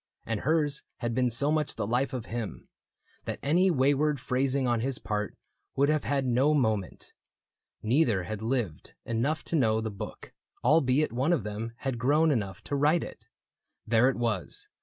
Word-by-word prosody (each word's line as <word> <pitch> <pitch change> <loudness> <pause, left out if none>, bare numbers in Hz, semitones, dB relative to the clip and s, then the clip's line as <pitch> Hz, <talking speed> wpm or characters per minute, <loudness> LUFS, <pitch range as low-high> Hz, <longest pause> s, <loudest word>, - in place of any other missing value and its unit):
And 115 -2 -2
hers 150 0 +1 0.2
had 120 -1 -2
been 125 +1 +2
so 140 +6 +1
much 155 -2 0
the - - -2
life 125 +6 0
of 125 -4 -4
him. 115 -2 -5 0.6
That - - -3
any 175 +7 +3
wayward 145 -1 +2
phrasing 130 +2 0
on 120 -1 +1
his 130 +2 0
part 105 -1 -3 0.4
Would 140 +2 +3
have 155 -1 +1
had 140 -2 0
no 130 +5 +3
moment. 110 - -1 0.7
Neither 115 - +2
had 110 +3 -5
lived 110 - -3
enough 130 +7 -1
To - - -3
know 110 -7 +3
the 110 0 -3
book, 100 - -8 0.3
albeit 145 +1 +3
one 130 +7 +1
of 155 - 0
them 105 +2 -5
Had 130 -4 -2
grown 150 +6 +3
enough 105 -6 -2
to 145 - -3
write 150 +4 +3
it. - - -10 0.6
There 115 +3 +4
it 135 - -1
was. 115 -7 -3
130 Hz, 175 wpm, -28 LUFS, 115-145 Hz, 0.7 s, There